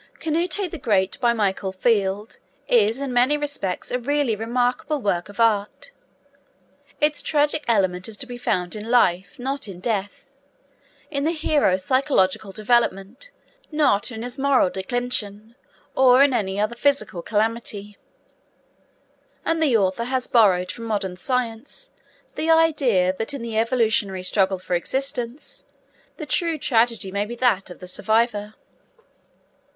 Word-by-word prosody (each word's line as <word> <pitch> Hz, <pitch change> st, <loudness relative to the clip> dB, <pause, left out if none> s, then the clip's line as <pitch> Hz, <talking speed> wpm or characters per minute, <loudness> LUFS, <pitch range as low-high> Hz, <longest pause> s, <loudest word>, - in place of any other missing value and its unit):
Canute 345 Hz, +4 st, -1 dB
The 335 Hz, -, -6 dB
Great, 195 Hz, -6 st, +1 dB
by 240 Hz, -2 st, +3 dB
Michael 200 Hz, -3 st, -1 dB
Field, 200 Hz, +1 st, 0 dB, 0.3 s
is 225 Hz, +1 st, +3 dB
in 275 Hz, -2 st, -3 dB
many 255 Hz, +5 st, +3 dB
respects 285 Hz, -11 st, -4 dB
a 250 Hz, -, 0 dB
really 280 Hz, -2 st, 0 dB
remarkable 245 Hz, +6 st, -1 dB
work 185 Hz, -5 st, -1 dB
of 205 Hz, -, -13 dB
art. 220 Hz, -, +1 dB, 1.1 s
Its 300 Hz, 0 st, +2 dB
tragic 300 Hz, 0 st, +1 dB
element 190 Hz, -5 st, +1 dB
is 215 Hz, -, -8 dB
to 265 Hz, -, -6 dB
be 245 Hz, -1 st, -8 dB
found 185 Hz, -7 st, -1 dB
in 215 Hz, +1 st, -7 dB
life, 185 Hz, -6 st, +2 dB
not 270 Hz, 0 st, -3 dB
in 185 Hz, -3 st, -9 dB
death; 205 Hz, -1 st, -3 dB, 0.9 s
in 280 Hz, -1 st, -1 dB
the 320 Hz, -, +2 dB
hero's 295 Hz, -, +1 dB
psychological 220 Hz, -7 st, +1 dB
development, 215 Hz, -, 0 dB, 0.4 s
not 275 Hz, -8 st, +2 dB
in 225 Hz, -1 st, -6 dB
his 245 Hz, +2 st, -6 dB
moral 270 Hz, -9 st, +3 dB
declension 220 Hz, 0 st, -3 dB, 0.4 s
or 260 Hz, 0 st, +6 dB
in 280 Hz, -2 st, +3 dB
any 195 Hz, -4 st, -1 dB
physical 235 Hz, -7 st, 0 dB
calamity; 210 Hz, -1 st, -2 dB, 1.5 s
and 330 Hz, 0 st, 0 dB
the 275 Hz, -7 st, +4 dB
author 195 Hz, +3 st, 0 dB
has 255 Hz, 0 st, -1 dB
borrowed 185 Hz, -6 st, +3 dB
from 230 Hz, -, -8 dB
modern 200 Hz, -4 st, -2 dB
science 250 Hz, -, -3 dB, 0.4 s
the 320 Hz, -, -2 dB
idea 280 Hz, -, +3 dB
that 225 Hz, +6 st, -2 dB
in 265 Hz, -, -6 dB
the 230 Hz, -1 st, -5 dB
evolutionary 220 Hz, -5 st, +1 dB
struggle 190 Hz, 0 st, +1 dB
for 185 Hz, 0 st, -5 dB
existence 250 Hz, -, -3 dB, 0.5 s
the 310 Hz, -, -6 dB
true 330 Hz, +2 st, 0 dB
tragedy 230 Hz, -7 st, +1 dB
may 200 Hz, +1 st, -1 dB
be 230 Hz, +3 st, -6 dB
that 230 Hz, -7 st, +1 dB
of 180 Hz, -, -10 dB
the 180 Hz, -, -11 dB
survivor. 215 Hz, +1 st, 0 dB
230 Hz, 140 wpm, -23 LUFS, 200-265 Hz, 1.5 s, or